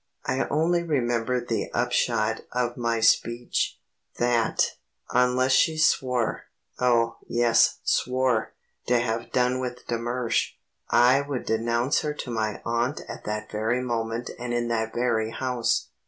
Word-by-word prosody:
I 130 - 0
only 170 +3 +2
remember 125 -6 0
the 120 -1 -3
upshot 115 -2 +1
of 120 -1 -1
my 115 -2 -1
speech; 120 +2 +1 0.4
that, 120 -1 +2 0.4
unless 125 +1 +3
she 160 +4 +3
swore 125 -6 +1 0.3
oh, 115 -2 +2
yes, 120 -1 +3
swore 125 -3 +1 0.3
to 125 - +4
have 120 0 -2
done 125 0 +1
with 125 -1 -5
de 120 -1 -2
Mersch, 120 0 -1 0.4
I 125 +3 +5
would 140 -3 -4
denounce 115 +4 +1
her 150 -1 -3
to 125 - -6
my 110 -2 -2
aunt 120 +4 -1
at - - -8
that 105 0 -4
very 115 +4 0
moment 115 -1 -2
and 120 0 -3
in 120 0 -1
that 110 -1 -1
very 115 -2 0
house. 125 0 -1
120 Hz, 140 wpm, -26 LUFS, 115-125 Hz, 0.4 s, I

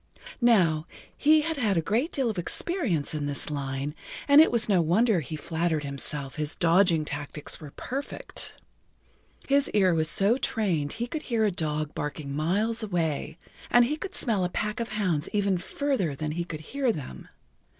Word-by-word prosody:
Now, 175 -10 +4 0.3
he 305 +1 +5
had 320 0 -2
had 210 -8 +1
a - - +5
great 235 - 0
deal 270 -3 0
of 215 -5 -2
experience 200 - -1
in 150 -2 -2
this 145 +2 -3
line, 140 0 -3 0.3
and 285 +1 +9
it 320 - +5
was 235 -1 +2
no 195 -4 +4
wonder 190 +5 +3
he 155 +1 -5
flattered 160 0 -1
himself 140 0 -4
his 150 0 -1
dodging 170 -2 +3
tactics 145 0 -6
were 150 - -8
perfect. 275 +3 -4 0.9
His 280 0 +3
ear 190 -4 +4
was 160 -1 +1
so 200 +8 +3
trained 175 - 0
he 235 - -2
could 300 +5 -4
hear 225 -2 +2
a 210 - +2
dog 155 -3 -2
barking 145 -1 -4
miles 205 +10 +1
away, 160 -6 -2 0.3
and 240 0 +6
he 295 +5 -1
could 380 +5 -7
smell 215 -6 0
a 180 - 0
pack 210 +5 -2
of 235 - -3
hounds 180 -8 0
even 200 -3 +1
further 210 - -1
than 150 +2 -3
he 170 +2 -3
could 155 -3 -6
hear 260 - 0
them. 125 - -7
180 Hz, 180 wpm, -27 LUFS, 155-230 Hz, 0.9 s, and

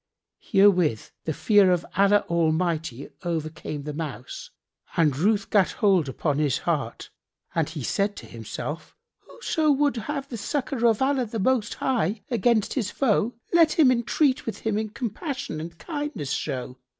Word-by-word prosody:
Herewith 185 - +3
the 160 - -1
fear 205 +3 +4
of 175 -2 +1
Allah 200 +2 +4
Almighty 165 -4 0
overcame 155 -3 -4
the 150 0 -5
Mouse 140 -6 -6 0.5
and 150 -5 +3
ruth 200 +6 +1
gat 200 -4 +3
hold 185 -8 +2
upon 145 +2 -1
his 145 -4 +2
heart 145 -9 -3 0.4
and 160 -2 0
he 155 -4 -6
said 200 - -1
in - - -13
himself, 115 +7 -6 0.3
"Whoso 320 -9 0
would 285 -2 +2
have 275 +4 -4
the 240 - -6
succour 250 +2 -1
of 225 +2 +2
Allah 265 -3 +1
the 225 - -5
Most 230 +1 +1
High 220 -5 -1
against 230 -1 +2
his 225 -8 -1
foe, 235 -2 +1 0.2
let 330 -2 +5
him 290 -6 +5
entreat 255 +3 +2
him 220 -1 -3
with 215 0 -2
compassion 250 - -4
and 165 +1 -8
kindness 290 - -4
show. 130 -3 -3
200 Hz, 150 wpm, -25 LUFS, 155-245 Hz, 0.5 s, let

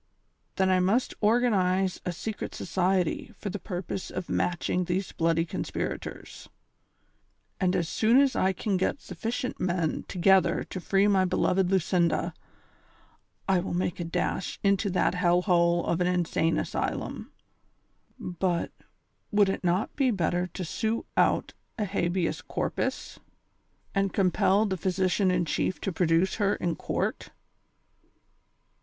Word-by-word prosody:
Then 190 -1 +2
I 185 - +4
must 200 +8 +1
organ 235 +3 +3
ize 185 -1 +1
a - - +1
secret 205 +5 -5
society 185 +3 0
for 200 - -5
the 205 - -4
purpose 185 -1 -5
of 185 - -5
matching 180 +1 0
these 180 +2 -2
bloody 165 0 +1
conspirators; - - -5 1.1
and 185 -2 +2
as 175 -3 0
soon 230 +8 +3
as 275 -1 +3
I 190 - +2
can 195 +1 -1
get 185 - 0
suflicient 250 0 -4
men 175 -3 -1
to - - -7
gether 180 -1 +4
to 185 - -7
free 195 +3 +2
my 195 -2 +4
beloved 185 0 +1
Lucinda, 170 -2 +1 1.1
I 190 -2 +3
will 175 0 -3
make 175 0 -1
a - - -1
dash 170 +2 -2
into 200 +1 +2
that 185 - +1
hell 180 -1 +2
hole 170 -2 +3
of 170 +1 0
an 180 - +2
insane 170 -2 +1
asj - - -1
lum; - - -7 0.9
but, 175 -1 -1 0.6
would 205 -2 +4
it 195 - -3
not 180 +4 0
be 270 -3 +2
better 180 -3 0
to 180 +1 -6
sue 220 +7 -2
out - - +2 0.2
a 210 - 0
habeas 180 -2 -1
corpus, - - -3 0.7
and 195 -1 +1
compel 195 +2 +3
the 190 -3 -1
physi 185 +1 0
cian 195 0 +2
in 180 -1 +1
chief 185 - -1
to 195 - -2
produce 165 +2 +2
her 205 -2 +2
in 170 -2 -2
court - - -3
185 Hz, 145 wpm, -27 LUFS, 175-195 Hz, 1.1 s, I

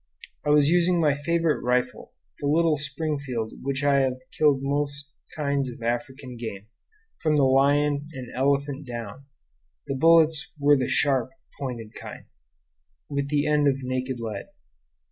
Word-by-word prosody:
I - - -2
was 145 -1 +5
using 175 0 +3
my 150 -3 +3
favorite 165 +2 0
rifle, 125 0 -1 0.3
the 145 - -2
little 160 +1 +3
Springfield 140 -5 -3
with - - -13
which 140 +1 -2
I 140 -1 +4
have 130 -1 +1 0.2
killed 145 -3 +3
most 140 0 -2 0.2
kinds 140 -3 -1
of 120 -1 -10
African 125 +1 -4
game, 105 -4 -6 0.6
from 155 -1 +2
the 145 - +4
lion 145 +2 +3
and 130 -4 -8
elephant 140 +1 0
down; 120 +2 -7 0.6
the - - -3
bullets 160 +1 +4
were 145 0 +5
the 130 -3 -1
sharp, 135 -4 +1 0.3
pointed 120 -6 -5
kind, - - -10 0.8
with 140 -1 -2
the 145 0 +1
end 150 -1 +3
of 135 -1 0
naked 130 0 -3
lead. 110 -4 -5
140 Hz, 150 wpm, -25 LUFS, 130-150 Hz, 0.8 s, was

